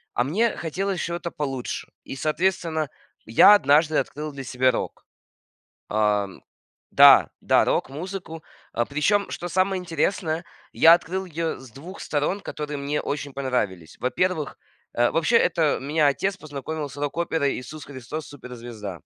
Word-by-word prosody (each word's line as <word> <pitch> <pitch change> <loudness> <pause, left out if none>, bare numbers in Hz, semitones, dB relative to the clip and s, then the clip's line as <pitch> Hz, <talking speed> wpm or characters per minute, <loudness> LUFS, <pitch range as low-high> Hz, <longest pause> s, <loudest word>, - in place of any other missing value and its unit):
А 120 - +2
мне 215 - 0
хотелось 185 +3 -2
чего-то 170 0 -3
получше. 135 -4 -4 0.2
И, - - -7
соответственно, 160 0 0 0.4
я 115 - +7
однажды 155 -2 +3
открыл 150 +1 -3
для 135 -1 -7
себя 130 +1 +2
рок. - - -5 0.8
Ам. 105 -2 0 0.5
Да, - - +8
да, - - +4
рок-музыку. 165 +2 -3 0.5
Причем, 200 +8 +1
что 175 - -4
самое 185 +1 +1
интересное, 165 0 -1 0.3
я 165 +1 +8
открыл 185 +2 -1
ее 165 -1 -3
с 130 -4 -13
2 170 - -10
сторон, 150 +7 -1
которые 150 -5 -5
мне 140 +2 -2
очень 140 -1 -4
понравились. 105 -11 -2
Во-первых, 155 +3 -1 0.4
э, 120 0 +3
вообще, 170 +9 +3
это 160 -6 +2
меня 150 +2 +2
отец 190 +7 0
познакомил 150 0 -5
с 140 - -12
рок-оперой 145 0 -1
"Иисус 145 +5 -8
Христос- 140 +3 -7
суперзвезда". 120 - -8
150 Hz, 135 wpm, -24 LUFS, 135-170 Hz, 0.8 s, Да